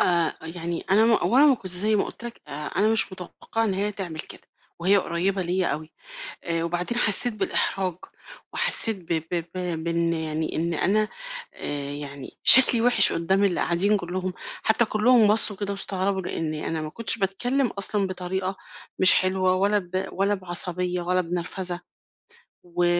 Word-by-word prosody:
آآ 170 -3 +1
يعني 165 +1 -5
أنا 215 +3 +4
م 230 - +3
هو 230 +2 +1
أنا 290 +3 +6
ما 280 - +5
كنتش 190 -6 -7
زي 210 +4 +3
ما - - +1
قُلت 240 - -10
لك 235 - -8
آآ - - -8
أنا 210 - 0
مش 220 -3 +2
متوقعة 185 +5 -5
إن 200 -4 -1
هي 205 +2 -2
تعمل 175 -6 -5
كده - - -8 0.4
وهي 195 +4 +4
قريبة 190 +2 -1
ليّا 180 +1 -1
أوي، 155 +1 -4 0.5
آآ 165 -1 -2
وبعدين 175 +7 -2
حسيت 235 +2 +5
بالإحراج 185 -3 0 0.6
وحسيت 225 -2 +2 0.2
ب 160 -1 -1
ب 170 -2 -1
ب 175 -3 -4
بإن 170 0 0
يعني 160 -1 -3
إن 170 +1 -2
أنا 210 +6 +1 0.5
آآ 145 -1 -5
يعني 140 -2 -8
شكلي 250 -2 +8
وِحِش 235 -5 +4
قدام 190 +4 +1
اللي 190 -3 0
قاعدين 195 +5 +2
كلّهم، 185 0 -4 0.3
حتى 230 +2 +3
كلّهم 220 +1 +3
بصوا 210 -1 +5
كده 200 0 -4
واستغربوا 195 -1 -3
لإن 160 -3 -4
أنا 155 +1 -4
ما 155 - -6
كنتش 230 +5 +2
باتكلم 245 +8 -1
أصلًا 200 -2 0
بطريقة 185 +1 -4 0.4
مش 185 - +8
حلوة 185 0 +1
ولا 200 +3 +1
ب 185 0 -4
ولا 200 +2 0
بعصبية 180 -1 0
ولا 180 +1 0
بنرفزة، 180 +1 -4 0.8
و 175 0 -2
185 Hz, 170 wpm, -24 LUFS, 170-205 Hz, 0.8 s, شكلي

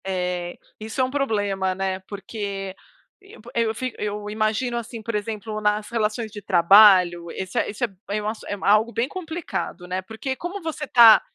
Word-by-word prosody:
Eh, 180 -2 -2 0.2
isso 220 +4 -6
é - - +4
um 255 - -1
problema, 205 -9 0
né, 190 0 -2
porque 200 -2 -5 0.8
eu 230 -2 +1
fi 255 +1 -3
eu 210 0 -3
imagino, 220 +3 0
assim, 230 0 -6
por 230 - -4
exemplo, 215 0 -3
nas 210 0 +1
relações 220 0 -1
de 205 -1 -8
trabalho, 180 -2 +6
esse 190 +2 -3
é - - -1
isso 215 +5 -5
é - - -4 0.3
esse 215 +1 -4
é - - -2
algo 215 +3 +4
bem 235 +2 0
complicado, 320 - -5
né, 185 +1 -2
porque 220 +7 -5
como 355 +7 -5
você 315 -2 -4
tá, 230 -4 +8
215 Hz, 170 wpm, -23 LUFS, 195-235 Hz, 0.8 s, tá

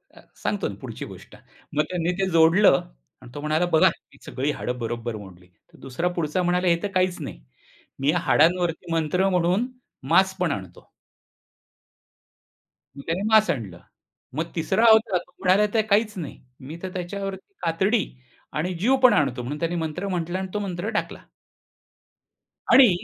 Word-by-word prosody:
अ, - - -15 0.2
सांगतो - - -1
ना - - -6
पुढची - - -7
गोष्ट. - - -12 0.4
मग 150 - +3
त्यांनी 175 -1 -1
ते 190 -1 +1
जोडलं 165 -1 +5 0.4
आणि 120 - -13
तो 145 - -5
म्हणाला, 155 +3 +1
बघा 160 -3 +4
ही - - -5
सगळी 140 +3 -2
हाडं 125 -3 -4
बरोबर 115 0 -4
मोडली 90 -3 -13
तर 90 - -25
दुसरा 135 +7 -3
पुढचा 170 +1 -1
म्हणाला, 180 +1 +1
"हे 170 -1 +3
तर - - +1
काहीच 185 -1 +1
नाही. - - -7 0.6
मी 140 +2 +1
या - - +1
हाडांवरती 170 +1 +2
मंत्र 165 +4 +1
म्हणून 180 +5 +1 0.4
मांस 190 +3 +4
पण 180 -3 +1
आणतो." 95 -7 -7 2.1
मग - - -7
त्याने 170 +4 -1
मांस 220 0 +5
आणलं. 100 - -3 0.6
मग 165 +2 -3
तिसरा 170 +8 +1
होता 220 -4 +4
तो 175 - -9
म्हणाला, 190 +2 +4
"तर 225 - +4
काहीच 210 +1 +3
नाही. 160 -5 -6 0.2
मी 145 +5 -9
तर 185 - -3
त्याच्यावरती 195 - -5
कातडी 190 +6 +2 0.5
आणि 175 +4 -1
जीव 250 +8 +3
पण 255 - +8
आणतो." 135 -4 +1
म्हणून 145 +5 -5
त्याने 170 +1 -1
मंत्र 165 +3 -3
म्हंटलं 175 -1 -2
आणि 190 - -3
तो 210 - -1
मंत्र 190 0 -3
टाकला. 215 -2 -3 1.5
आणि 260 -4 +9
175 Hz, 165 wpm, -24 LUFS, 150-190 Hz, 2.1 s, आणि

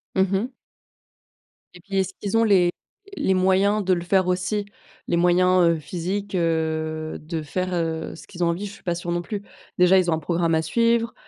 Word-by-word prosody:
Mmh 190 0 +2
mh. 205 +6 +1 1.3
Et 180 - -13
puis, 195 +1 -4
est-ce 190 0 0
qu'ils 205 +2 -1
ont 230 - +4
les 190 -5 +4 0.5
les 190 - +1
moyens 190 +3 +2
de 185 - +3
le 175 - -1
faire 185 +1 +2
aussi? 185 +3 -1 0.4
Les - - +1
moyens, 180 +1 +4
heu, 165 -1 +2
physiques, 190 +5 -4
heu, 160 -2 -1
de 160 +1 -4
faire, 185 +5 -3
heu, 165 -2 -2
ce - - -13
qu'ils 175 -2 -4
ont - - +3
envie? 175 +5 -2
Je 200 - -6
suis 220 - -16
pas 175 -1 -1
sûre 175 0 -4
non 175 0 0
plus. 205 +2 -5 0.3
Déjà 180 +1 +6
ils 175 -2 +2
ont - - +3
un 160 - -1
programme 165 +1 0
à 160 - +2
suivre, 230 +6 +1
180 Hz, 210 wpm, -23 LUFS, 170-195 Hz, 1.3 s, Déjà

